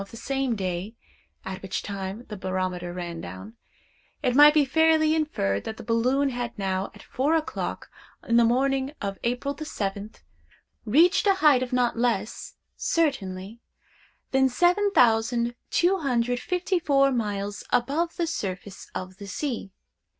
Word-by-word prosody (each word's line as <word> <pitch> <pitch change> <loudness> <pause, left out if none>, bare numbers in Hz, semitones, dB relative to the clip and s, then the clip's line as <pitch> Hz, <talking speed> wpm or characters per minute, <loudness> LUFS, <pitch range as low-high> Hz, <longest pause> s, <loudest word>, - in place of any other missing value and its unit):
of 195 - -15
the 230 - -10
same 270 0 -1
day 190 +2 -3 0.5
(at 190 0 -6
which 195 - -4
time 200 +3 -5
the 210 - -6
barometer 185 -2 -3
ran 175 -2 -5
down), 95 +5 -9 0.7
it 250 - +1
might 295 +2 +8
be 300 -2 +5
fairly 315 +2 +3
inferred 200 - 0
that 220 - -6
the - - -9
balloon 255 +5 +1
had 240 -2 -4
now, 190 -1 -1
at - - -13
four 285 +5 0
o'clock 315 -1 -3 0.4
in 230 - +2
the 235 - +6
morning 265 +3 +1
of 200 -2 -4
April 245 +4 -1
the 310 - -7
seventh, 205 -5 -5 0.6
reached 335 - +4
a 395 - +5
height 300 -8 +5
of 255 - -3
not 245 -2 +1
less, 230 -3 -1 0.2
certainly, 225 - -1 0.7
than 265 0 +4
7,254 275 - +2
miles 205 -4 -2
above 285 +8 +1
the 340 - 0
surface 195 - -5
of 185 0 -6
the 200 - -9
sea. 235 -2 -4
240 Hz, 140 wpm, -26 LUFS, 195-285 Hz, 0.7 s, might